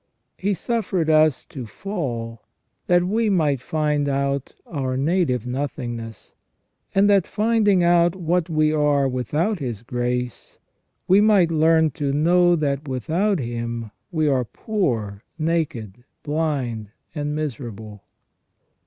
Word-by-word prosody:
He 200 Hz, +1 st, -1 dB
suffered 185 Hz, -6 st, -1 dB
us 155 Hz, -2 st, +3 dB
to 125 Hz, -4 st, -8 dB
fall, 120 Hz, -, -5 dB, 0.5 s
that 175 Hz, 0 st, +4 dB
we 215 Hz, +4 st, +1 dB
might 150 Hz, -9 st, +1 dB
find 150 Hz, 0 st, 0 dB
out 140 Hz, 0 st, -1 dB
our 130 Hz, -5 st, -3 dB
native 140 Hz, -, +1 dB
nothingness; 120 Hz, -4 st, -5 dB, 0.6 s
and 195 Hz, +1 st, +5 dB
that, 200 Hz, -3 st, +4 dB
finding 210 Hz, -4 st, +2 dB
out 170 Hz, 0 st, +4 dB
what 175 Hz, -1 st, 0 dB
we 155 Hz, -1 st, +2 dB
are 145 Hz, -2 st, +2 dB
without 150 Hz, -, -1 dB
His 120 Hz, -6 st, -5 dB
grace, 125 Hz, 0 st, -3 dB, 0.5 s
we 195 Hz, +3 st, +6 dB
might 200 Hz, -6 st, +4 dB
learn 160 Hz, 0 st, +4 dB
to 140 Hz, 0 st, -2 dB
know 175 Hz, +4 st, +4 dB
that 145 Hz, -2 st, -1 dB
without 165 Hz, -, 0 dB
Him 115 Hz, -3 st, -4 dB, 0.2 s
w^e 155 Hz, -3 st, +1 dB
are 130 Hz, -1 st, +1 dB
poor, 115 Hz, -, -2 dB
naked, 155 Hz, -, -2 dB, 0.2 s
blind, 140 Hz, -9 st, -2 dB, 0.2 s
and 150 Hz, -1 st, -3 dB
miserable. 110 Hz, -8 st, -6 dB
150 Hz, 120 wpm, -22 LUFS, 125-175 Hz, 0.6 s, we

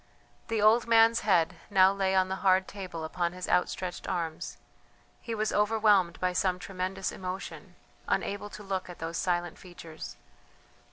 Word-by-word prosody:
The 225 Hz, -2 st, 0 dB
old 225 Hz, +2 st, +5 dB
man's 230 Hz, 0 st, +5 dB
head 180 Hz, -6 st, +2 dB
now 190 Hz, -1 st, +5 dB
lay 190 Hz, -1 st, 0 dB
on 185 Hz, 0 st, +3 dB
the 190 Hz, 0 st, -3 dB
hard 190 Hz, -1 st, +3 dB
table 185 Hz, -5 st, -7 dB
upon 170 Hz, +2 st, -2 dB
his 180 Hz, 0 st, -6 dB
outstretched 180 Hz, 0 st, -1 dB
arms; 165 Hz, -3 st, -3 dB, 0.6 s
he 230 Hz, -, -4 dB
was 215 Hz, 0 st, -1 dB
overwhelmed 210 Hz, -4 st, +3 dB
by 180 Hz, 0 st, 0 dB
some 180 Hz, 0 st, +1 dB
tremendous 190 Hz, +1 st, -3 dB
emotion, 185 Hz, +1 st, -7 dB, 0.3 s
unable 205 Hz, +1 st, -1 dB
to 210 Hz, -, -10 dB
look 190 Hz, -2 st, -3 dB
at 180 Hz, -, -9 dB
those 165 Hz, +1 st, -4 dB
silent 175 Hz, -2 st, -1 dB
features. 160 Hz, -, -10 dB
185 Hz, 155 wpm, -29 LUFS, 180-205 Hz, 0.6 s, old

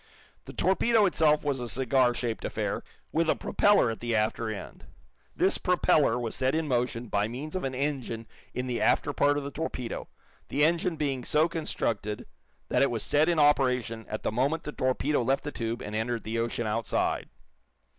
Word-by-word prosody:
The -, -, -9 dB
torpedo 210 Hz, +4 st, +3 dB
itself 155 Hz, -5 st, +3 dB
was 140 Hz, -3 st, -1 dB
a 120 Hz, -1 st, -4 dB
cigar 130 Hz, 0 st, +2 dB
shaped 115 Hz, -2 st, -3 dB
affair, -, -, -2 dB, 0.3 s
with 165 Hz, 0 st, +1 dB
a -, -, +4 dB
propeller 205 Hz, -, +3 dB
at 110 Hz, -, -6 dB
the 120 Hz, -1 st, -1 dB
after 110 Hz, +1 st, 0 dB
end. 110 Hz, -, -7 dB, 0.5 s
This 190 Hz, -, +2 dB
propeller 155 Hz, -, +3 dB
was 120 Hz, -2 st, -3 dB
set 130 Hz, +2 st, +1 dB
in 160 Hz, -1 st, 0 dB
motion 125 Hz, -2 st, -1 dB
by 105 Hz, 0 st, 0 dB
means 135 Hz, +8 st, -6 dB
of 185 Hz, -, -2 dB
an 130 Hz, -1 st, -2 dB
engine 130 Hz, -5 st, -2 dB, 0.3 s
in 125 Hz, -, -3 dB
the 125 Hz, -2 st, -2 dB
after 145 Hz, -, +2 dB
part 145 Hz, +1 st, +3 dB
of 145 Hz, -, -2 dB
the 140 Hz, -, -5 dB
torpedo, 140 Hz, -6 st, -4 dB, 0.4 s
the 145 Hz, +3 st, +3 dB
engine 170 Hz, +1 st, +1 dB
being 140 Hz, -4 st, -2 dB
so 155 Hz, +5 st, +3 dB
constructed 115 Hz, -, -2 dB, 0.4 s
that -, -, +1 dB
it 140 Hz, -, +4 dB
was 115 Hz, -3 st, -2 dB
set 150 Hz, +3 st, +3 dB
in 170 Hz, -, +2 dB
operation 125 Hz, -6 st, +2 dB
at 110 Hz, -, -4 dB
the -, -, 0 dB
moment 140 Hz, +8 st, 0 dB
the 150 Hz, -, -5 dB
torpedo 130 Hz, +1 st, 0 dB
left 135 Hz, +3 st, +1 dB
the 145 Hz, -, -4 dB
tube 115 Hz, -2 st, -3 dB
and 105 Hz, -, -5 dB
entered 115 Hz, +1 st, -1 dB
the 115 Hz, +1 st, -2 dB
ocean 115 Hz, 0 st, -2 dB
outside. 110 Hz, +1 st, -1 dB
130 Hz, 190 wpm, -28 LUFS, 115-150 Hz, 0.5 s, a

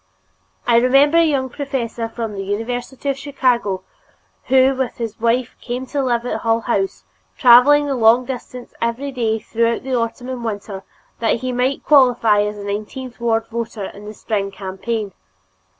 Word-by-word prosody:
I 230 Hz, -, +4 dB
remember 275 Hz, +6 st, +5 dB
a -, -, +6 dB
young 280 Hz, -5 st, +1 dB
professor 240 Hz, -4 st, -4 dB
from 225 Hz, -2 st, -5 dB
the 195 Hz, -, -4 dB
University 245 Hz, +7 st, -4 dB
of 275 Hz, -1 st, 0 dB
Chicago 245 Hz, -9 st, 0 dB, 0.6 s
who 265 Hz, +1 st, +4 dB
with 260 Hz, -2 st, -3 dB
his 230 Hz, -2 st, -5 dB
wife 235 Hz, +2 st, 0 dB
came 250 Hz, +1 st, -4 dB
to 280 Hz, +2 st, -2 dB
live 240 Hz, -2 st, 0 dB
at -, -, -2 dB
Hull 230 Hz, 0 st, +1 dB
House, 195 Hz, -, -1 dB, 0.3 s
traveling 255 Hz, +5 st, +7 dB
the 280 Hz, -, -1 dB
long 240 Hz, 0 st, +4 dB
distance 250 Hz, -1 st, -7 dB
every 235 Hz, +5 st, -2 dB
day 230 Hz, -4 st, 0 dB
throughout 230 Hz, +1 st, -1 dB
the 265 Hz, 0 st, -4 dB
autumn 245 Hz, +1 st, -2 dB
and 255 Hz, -2 st, -5 dB
winter 205 Hz, -3 st, -5 dB, 0.4 s
that 230 Hz, 0 st, +1 dB
he 255 Hz, 0 st, -2 dB
might 250 Hz, +2 st, 0 dB
qualify 245 Hz, -7 st, +5 dB
as 210 Hz, 0 st, -2 dB
a 205 Hz, -, -7 dB
nineteenth 215 Hz, +6 st, -5 dB
ward 225 Hz, -1 st, +1 dB
voter 225 Hz, -3 st, -4 dB
in 205 Hz, +1 st, -12 dB
the 215 Hz, +1 st, -8 dB
spring 200 Hz, -2 st, -2 dB
campaign. 195 Hz, +2 st, -4 dB
235 Hz, 165 wpm, -19 LUFS, 220-260 Hz, 0.6 s, traveling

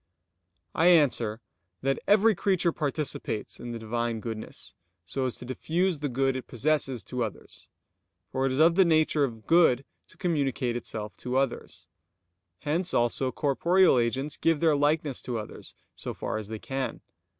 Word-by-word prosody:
I 165 Hz, -, +3 dB
answer 125 Hz, -10 st, +3 dB, 0.4 s
that, 135 Hz, 0 st, +1 dB
Every 215 Hz, +2 st, +5 dB
creature 185 Hz, -3 st, +1 dB
participates 145 Hz, -8 st, -3 dB
in 120 Hz, -, -6 dB
the 120 Hz, -, -4 dB
Divine 115 Hz, +1 st, -2 dB
goodness, 110 Hz, -1 st, -6 dB, 0.3 s
so 130 Hz, +9 st, -2 dB
as 125 Hz, -, -3 dB
to -, -, -9 dB
diffuse 165 Hz, +6 st, -1 dB
the 145 Hz, -1 st, -2 dB
good 135 Hz, +1 st, +1 dB
it 130 Hz, -, -5 dB
possesses 135 Hz, -1 st, 0 dB
to 125 Hz, -1 st, -3 dB
others; 110 Hz, -, -8 dB, 0.6 s
for 135 Hz, 0 st, +1 dB
it -, -, -1 dB
is 130 Hz, -, -1 dB
of 165 Hz, +3 st, +6 dB
the 190 Hz, +2 st, +6 dB
nature 155 Hz, -3 st, +3 dB
of 115 Hz, -5 st, -3 dB
good 160 Hz, -6 st, +4 dB, 0.2 s
to -, -, -18 dB
communicate 140 Hz, -, 0 dB
itself 110 Hz, -3 st, -5 dB
to 125 Hz, +1 st, -2 dB
others. 135 Hz, -2 st, -2 dB, 0.8 s
Hence 170 Hz, +5 st, -1 dB
also 120 Hz, +2 st, +1 dB
corporeal 160 Hz, +3 st, +3 dB
agents 135 Hz, +5 st, -1 dB
give 165 Hz, -2 st, +2 dB
their 160 Hz, -2 st, +4 dB
likeness 145 Hz, -1 st, +1 dB
to 120 Hz, -2 st, -3 dB
others 105 Hz, -1 st, -7 dB, 0.2 s
so -, -, -6 dB
far -, -, -3 dB
as 105 Hz, -, -7 dB
they 110 Hz, +1 st, -5 dB
can. 135 Hz, +4 st, -4 dB
135 Hz, 160 wpm, -28 LUFS, 120-160 Hz, 0.8 s, of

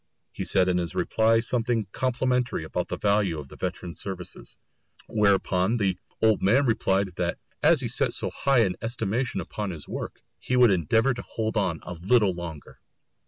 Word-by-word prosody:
He -, -, -5 dB
said 95 Hz, -1 st, +2 dB
in 90 Hz, -1 st, +2 dB
his 85 Hz, +1 st, -4 dB
reply 110 Hz, +5 st, +3 dB
something 115 Hz, -2 st, 0 dB
complimentary 125 Hz, -5 st, 0 dB
about 90 Hz, +3 st, -3 dB
the -, -, -4 dB
value 100 Hz, -5 st, +1 dB
of 70 Hz, -3 st, -8 dB
the -, -, -12 dB
veteran's 85 Hz, -2 st, -5 dB
services. 95 Hz, -3 st, -6 dB, 0.5 s
Whereupon 100 Hz, 0 st, +2 dB
the 95 Hz, -4 st, +1 dB, 0.3 s
old 110 Hz, -2 st, +4 dB
man 125 Hz, +9 st, +4 dB
replied 100 Hz, -4 st, +1 dB
that -, -, -1 dB, 0.2 s
as -, -, +5 dB
he -, -, -1 dB
set -, -, +1 dB
so -, -, -2 dB
high 135 Hz, -5 st, +3 dB
an 90 Hz, -, -2 dB
estimation 115 Hz, +1 st, -2 dB
upon 105 Hz, -2 st, -4 dB
his 80 Hz, -5 st, -7 dB
work, -, -, -6 dB, 0.2 s
he 125 Hz, -, -1 dB
would 125 Hz, -3 st, +6 dB
endeavour 110 Hz, -, +2 dB
to 120 Hz, -, -6 dB
hold 110 Hz, 0 st, -3 dB
on 90 Hz, -7 st, 0 dB
a 90 Hz, -, -6 dB
little 95 Hz, +3 st, +2 dB
longer! 85 Hz, -4 st, -8 dB
105 Hz, 175 wpm, -26 LUFS, 90-115 Hz, 0.5 s, would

